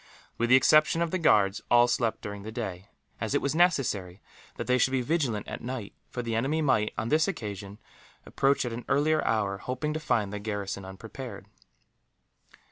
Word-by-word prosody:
With 120 0 +1
the 130 - +8
exception 155 +5 +5
of 170 - -3
the 185 - 0
guards, 105 - +3
all 120 0 +6
slept 115 -2 0
during 100 -1 -6
the 110 +2 -7
day; 100 -5 -5 0.3
as - - -2
it - - +6
was 140 - -1
necessary 130 - +1 0.4
that - - -4
they 125 0 +2
should 125 - +4
be 130 -1 0
vigilant 130 -8 -1
at - - -6
night, 120 -4 -5 0.2
for 125 - -4
the 115 -1 -3
enemy 135 +8 0
might, 120 -8 +2
on 110 +2 -2
this 155 +3 +3
occasion, 105 - -5 0.5
approach 135 -1 +1
at 120 - -3
an 120 +1 -6
earlier 155 +2 +2
hour, 100 -3 0
hoping 130 +6 -3
to 155 - -2
find 110 -9 0
the 105 - -3
garrison 100 -2 -4
unprepared. 100 +2 -9
120 Hz, 190 wpm, -28 LUFS, 105-140 Hz, 0.5 s, the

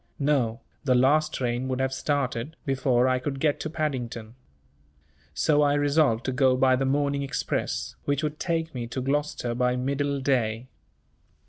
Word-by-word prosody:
No, 135 -6 +1 0.2
the 130 -3 +3
last 150 +5 +3
train 125 0 -2
would 130 -1 -2
have 130 0 0
started, 140 0 -2
before 130 -3 +2
I 130 0 +2
could 135 +1 -4
get 150 0 +1
to 155 - -4
Paddington. 125 -8 -3 1.0
So 150 - +3
I 145 -1 +3
resolved 145 -5 +2
to 130 - 0
go 130 -1 +3
by 130 0 +4
the 135 +1 0
morning 140 +1 +1
express, 65 - -2
which 145 +1 0
would 150 0 -3
take 165 -2 -1
me 120 -2 -4
to 120 - -4
Gloucester 135 -2 -1
by 125 +1 +1
middle 140 +2 -1
day. 125 -3 0
135 Hz, 160 wpm, -26 LUFS, 125-145 Hz, 1.0 s, by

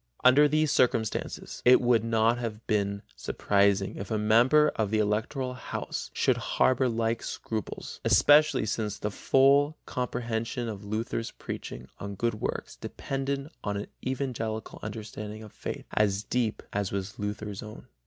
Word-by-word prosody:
Under 140 +4 +7
these 155 0 +2
circumstances 115 -3 0
it 125 +1 +7
would 120 -3 +3
not 115 +1 +2
have 115 -2 -5
been 100 -2 0
surprising 100 -1 +1
if 100 - -6
a 110 - 0
member 120 +8 +5
of 110 -3 -1
the 110 - +1
Electoral 110 +5 0
house 125 - -5
should - - +2 0.2
harbor 130 0 +4
like 115 0 0
scruples, 110 -1 -5
especially 150 -5 +5
since 105 -1 -2
the 105 0 -3
full 140 +7 +4
comprehension 120 -1 -2
of 105 -2 -6
Luther's 110 +2 -3
preaching 65 +1 -7
on 100 0 -5
good 115 +4 0
works - - -3
depended 140 +2 -4
on 100 -1 -1
an 100 - -4 0.2
evangelical 120 -5 -3
understanding 105 0 -6
of 105 - -12
faith, - - -6
as 100 -1 +2
deep 120 -3 -1
as 100 -2 -1
was 100 0 -4
Luther's 105 -1 -4
own. 110 0 -10
110 Hz, 145 wpm, -28 LUFS, 105-125 Hz, 0.2 s, Under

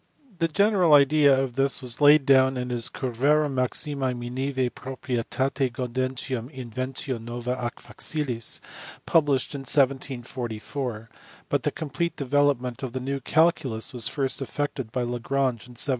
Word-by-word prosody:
The 165 - +3
general 185 -2 +4
idea 140 -1 +5
of 135 -2 -1
this 135 +2 +1
was 125 0 -4
laid 145 -1 +7
down 130 -1 +5
in 125 0 -3
his 120 -1 +1
Curvarum 140 +4 +1
Maximi 130 +1 -1
Miniimve 130 +1 -2
Proprietate 130 +1 -2
Gaudentium 130 0 -3
Inventio 130 -1 -4
Nova 120 +1 -4
ac 125 -2 -4
Facilis 130 -7 -2 0.4
published 145 -6 +2
in 140 - -4
1744, 125 -3 -1 0.4
but - - +1
the - - +1
complete 170 +3 -3
development 140 -3 +1
of 130 -3 -5
the 130 - -2
new 135 +2 -3
calculus 140 -6 +1
was 120 -2 -1
first 135 +1 -1
effected 135 -2 -3
by 125 0 -1
Lagrange 120 0 -1
in 125 - -14
1759. 120 - +2
130 Hz, 140 wpm, -26 LUFS, 125-140 Hz, 0.4 s, laid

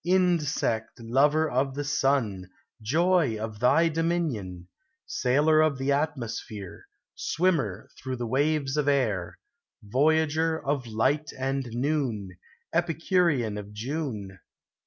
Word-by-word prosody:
Insect 165 -11 +1
lover 145 +7 +3
of 135 0 0
the 145 - -2
sun, 130 -10 0 0.3
Joy 160 +1 +2
of 110 -1 -5
thy 165 +8 +4
dominion! 150 - -2 0.4
Sailor 150 +5 +3
of 155 -3 +2
the 135 +2 0
atmosphere; 115 - -3 0.3
Swimmer 150 - 0
through 130 -1 -3
the 120 -1 -4
waves 140 +3 0
of 150 -1 +1
air, 105 -11 0 0.5
Voyager 160 +7 +2
of 135 -3 -1
light 135 +8 0
and 135 0 -2
noon, 120 -8 -1 0.4
Epicurean 165 - +1
of 105 0 -10
June! 110 - -4
135 Hz, 110 wpm, -27 LUFS, 110-155 Hz, 0.5 s, thy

